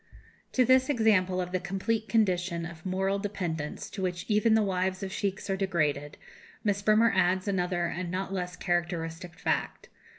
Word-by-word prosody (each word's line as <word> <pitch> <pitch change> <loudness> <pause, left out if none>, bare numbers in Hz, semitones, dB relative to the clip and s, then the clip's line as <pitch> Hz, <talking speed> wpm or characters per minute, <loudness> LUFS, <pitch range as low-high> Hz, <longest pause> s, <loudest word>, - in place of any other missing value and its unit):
To 255 - +4
this 260 +2 +4
example 205 -8 +3
of 180 -1 -3
the 185 - 0
complete 205 +4 -2
condition 180 -6 +1
of 160 0 -9
moral 190 +2 0
dependence 175 -7 -4
to 195 - -5
which 180 -1 -2
even 220 +1 +4
the 220 - +4
wives 185 0 -1
of 190 - -4
sheikhs 195 -1 -2
are 195 - 0
degraded, 155 -7 -1 0.5
Miss 200 -2 +1
Bremer 215 +2 +4
adds 185 +1 +2
another 180 -2 0
and 175 0 -3
not 190 +2 -3
less 180 -1 -3
characteristic 175 -1 -2
fact. - - -2
185 Hz, 165 wpm, -29 LUFS, 175-205 Hz, 0.5 s, To